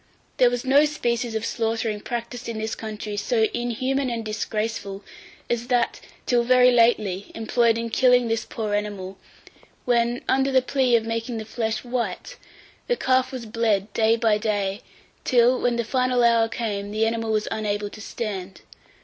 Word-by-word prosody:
853. - - +5
THERE 245 - +7
WAS 245 +1 -3
NO 280 +3 +5
SPECIES 235 -5 -1
OF 220 +1 -2
SLAUGHTERING 225 -2 -1
practised 240 +1 -5
in 230 - -4
this 220 +1 -3
country 215 -1 -6
so 220 +2 +1
inhuman 255 +3 -1
and 230 -2 -3
disgraceful 215 -2 -3 0.4
as 240 0 -2
that, 245 -2 +1 0.3
till 240 -1 +2
very 250 +1 +5
lately, 215 -5 +2
employed 230 0 +2
in 230 0 -4
killing 250 -1 +4
this 225 0 -1
poor 215 -2 -4
animal; 200 -2 -3 0.7
when, 240 0 +1
under 270 +1 +2
the 260 -1 +4
plea 255 -2 +2
of 225 -1 +2
making 230 +1 -3
the 220 - -5
flesh 220 0 -2
white, 245 - -4 0.5
the 485 - +1
calf 260 -5 +2
was 255 -3 -6
bled 215 -3 0
day 225 0 +3
by 225 -2 +2
day, 205 -2 -1 0.4
till, 245 +1 +3
when 245 -1 +1
the 235 - 0
final 250 +1 +1
hour 230 -1 +4
came, 205 -3 -3
the 215 +2 +1
animal 225 0 -1
was 215 -1 0
unable 205 -1 -2
to 215 - -10
stand. 195 -5 -5
230 Hz, 170 wpm, -24 LUFS, 215-245 Hz, 0.7 s, THERE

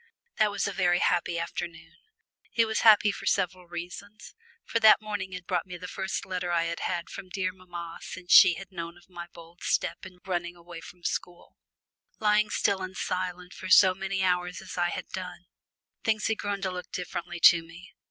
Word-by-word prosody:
That 215 -1 +4
was 205 0 -1
a 200 - -3
very 180 -2 +2
happy 175 -1 +1
afternoon. 170 -1 -5 0.6
It 230 - +4
was 220 0 -1
happy 215 -2 +6
for - - -7
several 180 0 0
reasons, 180 +5 -8 0.3
for 230 - 0
that 220 -1 +8
morning 205 -3 -5
had 180 -1 -7
brought - - -1
me 180 -1 -7
the 180 +1 -8
first 190 0 -3
letter 180 -1 -3
I 170 -1 +2
had 170 0 -3
had 175 -2 -2
from 185 - -9
dear 185 0 -2
mamma 175 -2 -8
since 185 -1 -8
she 185 -3 +9
had 190 +3 -9
heard 170 0 -6
of 175 +1 -22
my 175 -1 -8
bold 170 +1 -15
step - - -1
in 180 - -16
running 175 -2 -2
away 170 -1 -11
from 175 +1 -13
school! 175 0 -4 0.6
Lying 215 0 +3
still 200 -2 +1
and 185 0 -6
silent 180 -1 -3
for 185 - -8
so 185 0 +7
many 190 0 -2
hours 180 -1 0
as - - -9
I 175 -1 +1
had - - -5
done, - - -7 0.6
things 215 -1 +1
had 220 - 0
grown 200 -1 -2
to 190 - 0
look 180 0 -7
differently 175 -1 -5
to 170 0 +8
me. 165 +4 -14
180 Hz, 200 wpm, -28 LUFS, 175-195 Hz, 0.6 s, she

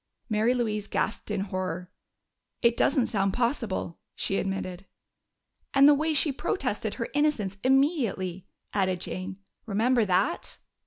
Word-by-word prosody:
Mary 220 +3 +2
Louise 215 -4 -1
gasped 220 - -2
in 205 -2 -1
horror. 185 -2 -4 0.7
"It 235 0 +5
doesn't 270 -1 +3
sound 195 -2 0
possible," 230 - -1 0.2
she 195 - 0
admitted. 195 -1 -3 0.9
"And 275 +1 +8
the 295 - +8
way 310 +2 +1
she 295 +1 +4
protested 235 - -2
her 230 - -3
innocence 260 -10 0
immediately," 245 - +1 0.3
added 185 -3 +1
Jane. 185 +2 -5 0.3
"Remember 230 +3 +3
that?" 190 - 0
215 Hz, 125 wpm, -27 LUFS, 190-260 Hz, 0.9 s, And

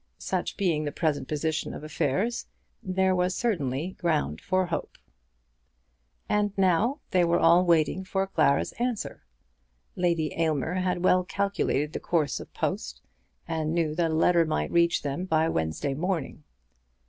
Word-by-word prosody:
Such - - -3
being 170 -6 +1
the 145 - -2
present 155 -3 -1
position 155 +1 -2
of - - -8
affairs, 160 - -1 0.3
there 190 0 +1
was 180 +1 +1
certainly 165 - -1
ground 150 - 0
for 185 0 +1
hope. 175 -2 -4 1.3
And 205 -1 0
now 195 - +2
they 180 -2 +4
were 170 0 +3
all 170 +2 +5
waiting 170 +2 +2
for 190 +1 -1
Clara's 140 -7 +2
answer. 240 -3 -2 0.7
Lady 170 -3 0
Aylmer 160 -1 0
had 185 -1 -1
well 185 0 +4
calculated 180 -7 -1
the - - -3
course 155 -5 0
of - - -10
post, - - -3 0.4
and 160 0 -1
knew 160 -3 +1
that 165 0 +1
a - - -1
letter 170 +1 +4
might 155 -1 -1
reach 170 0 +3
them 145 +6 -3
by 160 -2 +2
Wednesday 80 - -1
morning. 160 -2 -3
170 Hz, 150 wpm, -27 LUFS, 155-185 Hz, 1.3 s, all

